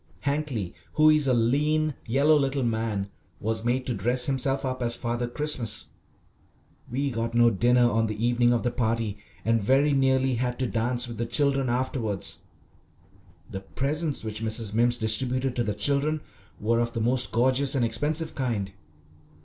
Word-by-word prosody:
Hankly, 140 - -2 0.2
who 155 0 +5
is 150 -2 +3
a 130 - +3
lean, 150 +6 +1
yellow 140 +6 +4
little 135 -2 +1
man, 110 -4 -2 0.3
was 110 +1 -2
made 125 +2 0
to 125 - -1
dress 120 +5 +1
himself 135 0 0
up 130 -1 -3
as 120 -1 0
"Father 120 0 -2
Christmas." 125 -4 -3 1.0
We 135 +3 -1
got 115 0 -3
no 120 0 +5
dinner 120 +4 +3
on 115 -1 +1
the 110 - -3
evening 120 0 +3
of 120 -2 +1
the 120 - 0
party, 115 -3 -1 0.3
and 115 0 +2
very 135 +7 +3
nearly 130 -1 +2
had 125 +1 -2
to 130 - -1
dance 120 +1 0
with 120 -2 -7
the 120 - -1
children 135 0 +2
afterwards. 120 -5 -2 1.1
The 95 - -4
presents 145 - -2
which 110 0 -4
Mrs. 110 -1 -1
Mimms 120 +2 +2
distributed 125 +3 +1
to 120 - 0
the 105 -2 -2
children 145 +5 +1 0.4
were 115 +2 +1
of 120 0 -1
the - - -2
most 125 +3 0
gorgeous 130 +4 +2
and 125 -3 +2
expensive 155 +7 -1
kind. 115 -8 -2
120 Hz, 165 wpm, -26 LUFS, 115-135 Hz, 1.1 s, who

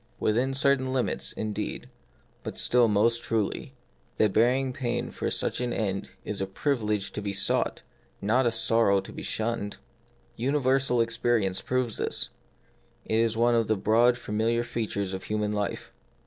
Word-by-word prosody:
Within 125 +5 +1
cer 140 +1 +4
tain 130 0 -3
limits, 130 -2 -1
indeed, 105 -1 -4 0.5
but - - -6
still 120 -1 +4
most 115 +3 +2
truly, 115 +5 -2 0.4
the 110 - +4
bearing 125 +5 +2
pain 125 -4 -2
for - - -3
such - - -2
an 125 -1 -1
end 100 -4 -2 0.2
is 105 -2 -3
a 95 - -1
privilege 105 -2 -1
to 105 - -5
be 100 -1 -3
sought, 100 - +1 0.4
not 120 +5 +2
a - - +2
sorrow 115 -3 +3
to - - -9
be - - -7
shunned. 110 -2 -3 0.6
Uni 135 +5 +1
versal 130 -3 +2
experience 115 -4 +1
proves 125 -3 -1
this: - - -1 0.8
it 110 - +1
is 115 -1 +1
one 120 +1 +4
of 115 -1 +2
the 110 - +1
broad 120 +5 +4
familiar 115 +1 0
features 105 -5 -3
of 95 - -5
human 105 -1 -1
life. 105 -1 -3
115 Hz, 160 wpm, -27 LUFS, 105-125 Hz, 0.8 s, cer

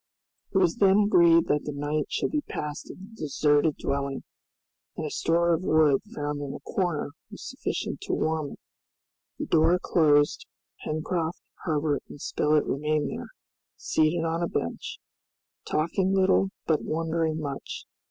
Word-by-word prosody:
It - - +1
was 180 -3 +3
then 195 +1 +5
agreed 170 -4 +6
that 150 0 0
the 150 - -3
night 145 +1 -1
should - - -1
be 300 - 0
passed 150 - -5
in - - -9
the 220 - -13
deserted 145 0 +2
dwelling, 140 -1 -2 0.7
and 160 - -3
a 150 - -4
store 170 +1 +2
of 165 - 0
wood 155 -5 +4
found 145 0 -3
in 140 -1 -5
a - - -7
corner 175 -6 -1 0.2
was - - -9
sufficient - - -4
to - - 0
warm 155 -2 -1
it. - - -14 0.8
The - - -3
door 165 +2 +4
closed, 155 - +3 0.4
Pencroft, 160 +2 -2 0.2
Herbert 150 -3 0
and - - -10
Spilett 150 +2 +1
remained 150 +1 0
there, - - -6 0.5
seated 160 +2 +1
on 165 +1 -1
a 170 - +1
bench, 85 - -3 0.7
talking 185 +5 +1
little 190 0 +3 0.2
but 160 -2 +2
wondering 160 0 -1
much. 140 -3 -5
155 Hz, 150 wpm, -27 LUFS, 145-170 Hz, 0.8 s, agreed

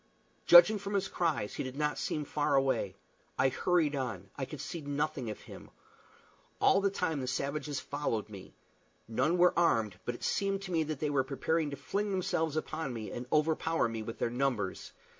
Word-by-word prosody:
Judging 190 +5 +9
from 200 +1 -4
his 195 -1 +1
cries, 165 - -1
he - - -3
did 130 0 -6
not 150 -1 0
seem 150 +2 -2
far 145 0 0
away. 135 -1 +1 0.4
I 130 0 +4
hurried 155 +1 +1
on. 110 -8 -4
I 135 - -3
could 150 +2 -8
see 170 - -5
nothing 145 -3 -2
of 105 - -6
him. - - -12 0.9
All 195 - +4
the 200 - +3
time 170 -7 -1
the 130 - -4
savages 140 +2 -2
followed 140 -7 -2
me. 100 -3 -11 0.5
None 130 +10 +1
were 180 0 +5
armed; 110 - +2
but 120 - -3
it - - -11
seemed 195 0 0
to 190 - -6
me 165 -2 +2
that 155 -2 -4
they 150 -1 0
were 135 -2 +2
preparing 145 +4 -1
to 140 - -5
fling 200 +9 -2
themselves 165 -5 0
upon 155 -2 -3
me 110 -2 -6
and 125 +1 -6
overpower 160 -1 +2
me 115 -1 -4
with 115 +1 -6
their 115 - -1
numbers. 120 -7 -1
145 Hz, 195 wpm, -31 LUFS, 125-165 Hz, 0.9 s, Judging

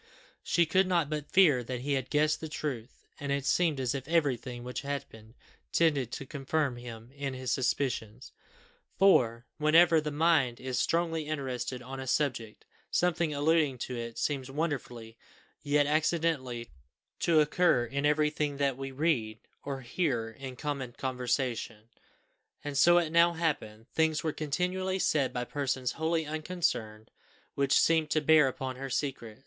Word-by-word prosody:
She 170 - +2
could 185 +4 +2
not 170 -5 +1
but 150 -1 -4
fear 150 -10 +5
that 125 0 -5
he 140 +2 -1
had 130 -2 -2
guessed 155 +1 +2
the 160 - -5
truth; 135 -6 -5
and 140 -1 -3
it 140 -1 -1
seemed 160 -2 +2
as 130 -1 0
if 135 -1 -5
everything 130 -7 0
which 125 +1 -5
happened 135 -5 -7 0.4
tended 145 -7 +2
to 140 - -5
confirm 140 -1 -2
him 120 -1 -10
in 140 -1 -4
his 130 -1 -3
suspicions; 125 -3 -2 0.7
for, 125 -11 +4
whenever 160 +1 +5
the 150 - -3
mind 145 -5 +2
is 130 -1 -2
strongly 165 -1 0
interested 130 -4 -3
on 135 +2 -7
any 130 - -6
subject, 120 -6 -1 0.2
something 170 -2 +1
alluding 150 -2 +2
to 125 +1 -5
it 115 -1 -6
seems 135 -3 -2
wonderfully, 125 -7 -4 0.4
yet 145 0 +2
accidentally, 150 - 0 0.5
to 165 -2 +3
occur 150 -4 +3
in 140 +4 -3
everything 150 -1 +1
that 140 -2 0
we 135 0 -5
read, 130 -6 0 0.3
or 135 -1 -4
hear 120 -4 -1
in 130 +2 -8
common 140 -3 -4
conversation, 125 -3 -3 0.7
and 145 -1 -5
so 175 +5 +6
it 165 -3 +1
now 170 +1 +5
happened; 140 -10 -2
things 160 -1 +1
were 160 -2 -1
continually 180 +5 -1
said 150 -7 +1
by 125 - -2
persons 130 -1 -2
wholly 160 0 -1
unconcerned, 150 -9 -3 0.4
which 140 0 +3
seemed 160 -2 +3
to 155 - +2
bear 155 -1 +5
upon 130 0 -4
her 135 +1 -5
secret. 125 -5 -3
140 Hz, 155 wpm, -30 LUFS, 125-155 Hz, 0.7 s, so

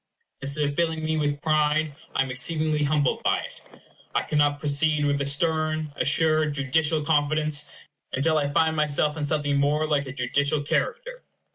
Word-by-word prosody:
Instead 140 +2 +1
of 145 - -4
filling 160 -1 -1
me 160 0 0
with 145 -2 -1
pride, 155 -1 +1 0.2
I - - +3
am 135 - -6
exceedingly 155 +3 0
humbled 145 -2 +1
by - - +2
it. - - -10 0.5
I - - +2
cannot 145 -1 +1
proceed 150 +1 +1
with 145 0 0
a 140 - 0
stern, 155 0 0
assured, 155 0 +2
judicial 150 +3 +1
confidence, 150 0 0 0.5
until 155 +4 +1
I 145 -1 -1
find 160 +2 +2
myself 150 -1 0
in 150 -2 -3
something 145 -2 0
more 145 +2 +1
like 145 -2 0
a - - -5
judicial 140 +4 0
character. - - -2
150 Hz, 165 wpm, -25 LUFS, 145-155 Hz, 0.5 s, I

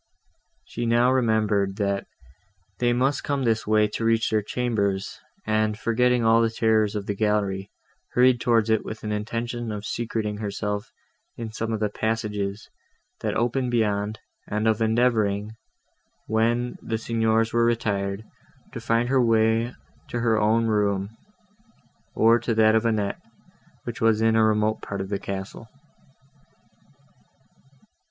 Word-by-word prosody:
She 120 0 -4
now 120 +2 +4
remembered, 110 -6 +1
that 100 -1 -1 0.7
they 120 0 +2
must 130 +4 +1
come 140 -2 -1
this 115 -3 0
way 110 0 +4
to 115 0 +1
their 110 -1 +2
chambers, 100 -4 -2 0.3
and, 110 0 +1
forgetting 120 +1 +1
all 115 +1 +5
the 115 - +2
terrors 110 -2 +1
of 100 -1 -3
the 100 - -2
gallery, 100 -2 -1 0.4
hurried 125 -1 +4
towards 115 -2 +2
it 110 - +2
with 110 - -8
an 105 - -3
intention 115 +2 -3
of 105 -1 -5
secreting 110 -3 -3
herself 105 0 -4 0.5
in 115 -2 -5
some 115 +1 -3
of 110 - -1
the 105 -1 0
passages, 105 -2 -3 0.5
that - - -2
opened 125 +2 0
beyond, 105 -2 0 0.3
and 105 +1 -1
of 110 0 +1
endeavouring, 110 -3 +1 0.7
when 120 +3 0
the 110 - -2
Signors 110 0 0
were 120 0 +3
retired, 100 -3 -1 0.5
to - - -6
find 115 +1 +1
her 135 -1 +3
way 115 +1 +2 0.4
to 120 - -3
her 115 -2 +2
own 110 +2 +3
room, 105 -1 0 1.0
or 115 +2 +5
to 115 -1 -2
that 110 0 +5
of 110 +1 +2
Annette, 105 -3 -1 0.6
which - - -6
was 115 -1 +3
in 110 0 +3
a 110 - +4
remote 110 0 +1
part 100 - -5
of 95 0 -4
the 100 -1 -2
castle. 100 +3 -6
110 Hz, 145 wpm, -24 LUFS, 105-115 Hz, 1.0 s, all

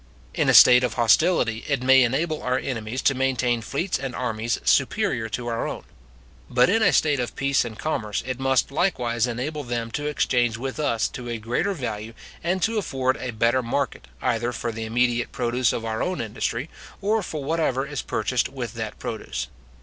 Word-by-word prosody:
In - - +1
a - - +5
state 125 0 +9
of 125 - -1
hostility, 120 -1 +3
it 140 -3 0
may 130 +1 +6
enable 150 +6 0
our 125 0 0
enemies 120 0 -4
to 140 - +4
maintain 125 -2 0
fleets 145 - -2
and 135 -2 -5
armies 115 -2 -2
superior 110 -1 +2
to 120 +2 -4
our 115 -1 -2
own; - - -6 0.7
but 125 +3 +4
in 225 +2 +3
a 200 -4 +5
state 150 -4 +2
of 125 - -3
peace 140 -1 +2
and 115 -3 -7
commerce 110 -10 -2
it 130 0 -4
must 135 0 +1
likewise 125 - 0
enable 140 +6 -3
them 120 -2 -3
to 145 +5 -3
exchange 120 -6 +1
with 135 +4 -5
us 115 -7 +1
to 120 -1 -7
a 115 - -2
greater 120 - -1
value, 115 -5 -5 0.3
and 180 +2 0
to 225 -1 +1
afford 130 -8 0
a 130 - -5
better 115 +2 +2
market, 120 - -2 0.2
either 120 +1 0
for 120 0 -3
the 110 0 -5
immediate 120 +1 +1
produce 120 0 +1
of 115 - -4
our 110 0 -2
own 185 0 -1
industry, 115 +3 -3 0.3
or 215 +2 +1
for 155 -6 -5
whatever 140 -3 0
is 145 -1 -4
purchased - - -1
with - - -5
that - - -5
produce. - - -5
125 Hz, 190 wpm, -24 LUFS, 115-140 Hz, 0.7 s, state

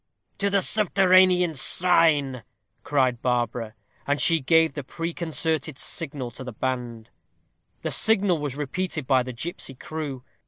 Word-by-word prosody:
"To 200 0 +1
the 200 -1 +2
subterranean 185 -4 +4
shrine," 145 -4 +2 0.4
cried 130 -4 +1
Barbara. 120 -2 -2 0.3
And 145 +1 +1
she 165 -1 +3
gave 160 +3 +3
the 145 - -6
preconcerted 160 -1 -3
signal 140 -7 -2
to 125 - -9
the 125 - -7
band. 120 -2 -4 0.7
The - - -2
signal 200 -6 +3
was 145 -3 -4
repeated 150 +1 -3
by 130 -1 +3
the 125 +1 -5
gipsy 135 +1 -5
crew. 145 -2 -6
150 Hz, 130 wpm, -24 LUFS, 130-175 Hz, 0.7 s, subterranean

